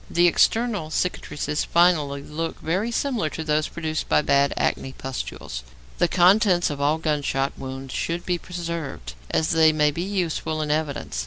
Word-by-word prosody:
The 175 +1 +3
external 210 0 +2
cicatrices 150 -3 -2
finally 155 -5 +2
look 165 +3 -4
very 185 +8 -1
similar 235 - -1
to 160 - -5
those 155 0 +1
produced 160 -2 -4
by - - +4
bad 140 0 +3
acne 130 - -1
pustules. 130 - -6 0.4
The - - +4
contents 185 -1 +4
of 140 -1 -5
all 150 +2 +2
gunshot 145 -3 -1
wounds 135 0 -7
should 170 +1 -2
be 175 -1 0
preserved, 165 - -5 0.2
as 160 - +1
they 160 -1 +5
may 150 -1 +2
be 165 - -4
useful 175 -4 -2
in 150 - -2
evidence. 150 - -2
160 Hz, 160 wpm, -24 LUFS, 145-175 Hz, 0.4 s, they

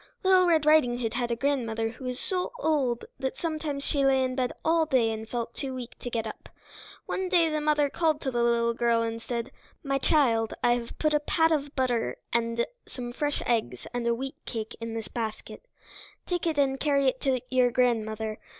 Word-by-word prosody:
Little 375 -1 +5
Red 320 -3 +3
Riding 305 -6 +5
Hood 230 -2 -2
had 240 0 -1
a 235 - 0
grandmother 230 -4 0
who 240 +3 -10
was 250 0 -3
so 365 +1 -1
old 280 - 0
that 265 0 -2
sometimes 310 -4 -3
she 280 -1 +1
lay 265 -1 +4
in 255 0 -1
bed 255 -1 0
all 325 0 +3
day 250 -6 +3
and 220 0 -6
felt 235 -1 -3
too 265 -2 -4
weak 245 -2 -6
to 245 - -5
get 230 -2 -2
up. 220 - -8 0.6
One 375 -1 -2
day 340 -3 +4
the 305 0 0
mother 300 -1 +3
called 310 +1 +1
the 265 - -2
little 235 -1 +2
girl 235 0 +2
to - - 0
her 225 - -1
and 230 0 -7
said, 235 +2 -4 0.3
"My 275 -1 0
child, 235 -8 +2
I 240 - +5
have 240 -1 -4
put 305 -1 +1
a 300 - +4
pat 320 +2 +2
of 290 -2 -1
butter 250 -4 0 0.2
and 235 0 +1 0.2
some 240 -1 -6
fresh 290 +2 -1
eggs 230 -2 -1
and 240 -1 -1
a 235 - +3
wheatcake 240 -3 -6
in 230 0 -4
this 225 -1 -4
basket. 230 - -5 0.6
Take 350 -1 -1
it 320 -2 0
and 270 -1 +2
carry 280 -2 +2
it 260 0 0
to 265 -2 +1
your 255 -1 +4
grandmother. 220 -3 0
255 Hz, 210 wpm, -28 LUFS, 235-295 Hz, 0.6 s, Little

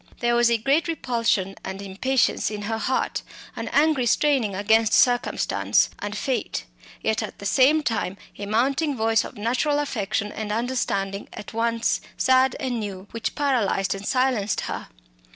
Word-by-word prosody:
There 240 0 +1
was 240 0 +4
a 235 - +3
great 275 +7 +1
repulsion 230 - 0
and 190 - -5
impatience 200 +7 0
in 210 -1 -5
her 220 +2 -2
heart, 260 +4 -1 0.3
an - - -5
angry 290 -4 +2
straining 255 -7 +2
against 220 +2 +3
circumstance 245 -1 +2
and 205 0 -4
fate; 255 - -2 0.4
yet 220 0 +1
at 215 - -6
the 200 - -9
same 285 +7 +4
time 210 -6 -1 0.2
a 200 - -4
mounting 275 +7 +1
voice 225 0 +2
of - - -9
natural 255 +7 +1
affection, 210 -7 -2
an 215 -1 -5
understanding 210 -4 -2
at 210 - -9
once 230 0 0 0.2
sad 260 0 +4
and 250 -3 -2
new, 200 -2 -6
which 230 -1 -3
paralysed 240 -9 +1
and 195 +1 -7
silenced 255 -6 +1
her. - - -5
230 Hz, 155 wpm, -24 LUFS, 205-260 Hz, 0.4 s, was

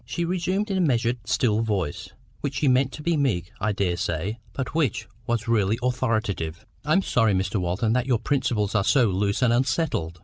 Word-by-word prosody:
She 170 - -3
resumed 185 +4 -1
in 190 - 0
a - - +3
measured 120 -5 +1
still 110 -2 +2
voice, 100 -9 -2 0.3
which 140 -1 -3
she 150 - +1
meant 130 +1 +3
to 150 - -8
be 170 +1 +1
meek, 110 - 0
I 105 +1 0
daresay, 90 +1 -1
but 130 -1 -4
which 135 -10 0 0.2
was 115 -1 -1
really 110 -2 +2
authoritative— 110 -10 -1 0.2
"I 150 +2 +1
am 190 +3 +3
sorry, 115 - +2
Mr 95 +3 0
Walton, 90 +6 0
that 125 +1 0
your 125 -3 +3
principles 115 -4 0
are 105 -3 +2
so 120 0 +4
loose 100 +5 0
and 120 -2 +4
unsettled. 120 - 0
115 Hz, 195 wpm, -25 LUFS, 100-135 Hz, 0.3 s, so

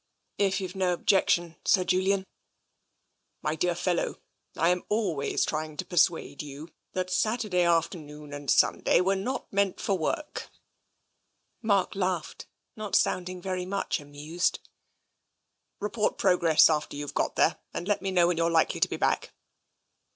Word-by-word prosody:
" - - -51
" - - -50
If 195 - -1
youVe 185 -2 -5
no 185 -2 +1
objection, 175 -2 +2
Sir 185 - +4
Julian/' 190 +2 +1 0.6
" - - -50
My 150 - 0
dear 175 +2 0
fellow, 175 0 -1 0.4
Tm 175 +2 +2
always 200 -10 0
trying 155 -1 -4
to - - -3
persuade 175 -5 +1
you 145 +2 -9 0.2
that 185 0 -2
Saturday 210 -1 +1
afternoon 155 -4 -1
and 145 -1 -6
Sunday - - +4
were 190 +2 +2
not 200 +5 -4
meant 200 -1 +1
for 195 - 0
work/' 300 - -3 1.1
Mark 200 -5 +2
laughed, 185 -4 -3 0.3
not 215 -2 -3
sounding 180 0 0
very 185 -1 -3
much 195 +1 -1
amused. 150 +4 -2 0.7
" - - -52
Report 210 +1 -1
progress 170 -4 +5
after 150 -2 -1
you've 145 -1 -5
got - - -1
there - - +2
and 175 - -5
let 205 - +1
me 195 - -2
know 180 -2 +4
when 175 -1 +1
you're 165 0 +2
likely 165 -1 +2
to - - +3
be - - -3
back." - - 0
180 Hz, 155 wpm, -28 LUFS, 160-195 Hz, 1.1 s, progress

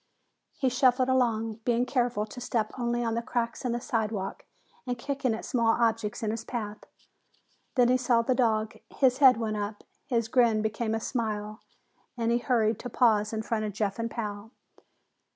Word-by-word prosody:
He 265 - +1
shuffled 255 +1 +3
along, 225 -4 +1
being 240 +1 +2
careful 245 -5 0
to 235 +3 -10
step 225 -3 -1
only 240 -1 -1
on 230 -1 -1
the 230 - -1
cracks 235 -1 -2
in 250 - -1
the 240 - -1
sidewalk 220 -6 -3 0.4
and 245 -1 -2
kicking 265 -2 -1
at - - -7
small 230 -2 +2
objects 225 -2 0
in 215 - 0
his 225 0 -4
path. 215 -3 -5 1.0
Then 245 -2 +5
he 255 - +4
saw 240 -2 +2
the 255 - +2
dog. 220 -4 +1
His 260 -1 +2
head 265 -4 +7
went 220 -2 -2
up, 205 0 -4 0.2
his 230 -5 0
grin 230 -3 +3
became 220 +1 -1
a - - -1
smile, 215 -3 -3 0.6
and 230 -1 0
he 235 - +2
hurried 230 -4 +1
to 245 - -6
pause 215 -3 +3
in 220 -1 -3
front 220 -1 -1
of 210 - -4
Jeff 205 0 -2
and 230 0 -1
Pal. 210 -2 -5
230 Hz, 185 wpm, -28 LUFS, 215-245 Hz, 1.0 s, head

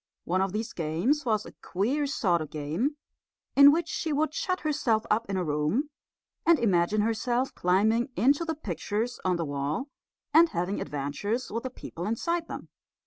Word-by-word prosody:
One 185 +2 0
of 190 0 0
these 215 +3 -3
games 180 - 0
was 215 -2 +1
a - - -9
queer 260 +11 0
sort 185 - +1
of 155 - -5
game, 165 - -2 0.6
in 280 +1 +9
which 335 +2 0
she 320 - -2
would 300 +1 +1
shut 370 +2 -1
herself 280 -8 +1
up 220 0 +1
in 195 - -1
a 185 - 0
room, 155 - 0 0.5
and 335 -1 +5
imagine 200 -2 +2
herself 240 +4 0
climbing 220 +7 +2
into 280 +6 +3
the 325 -1 -2
pictures 215 - -3
on 185 -1 +2
the 170 -1 -2
wall 145 - -2 0.4
and 330 +2 +7
having 185 - -2
adventures 150 - -3
with 230 - -2
the 260 - -4
people 180 -7 -7
inside 335 +10 -1
them. - - -7
220 Hz, 175 wpm, -28 LUFS, 180-285 Hz, 0.6 s, in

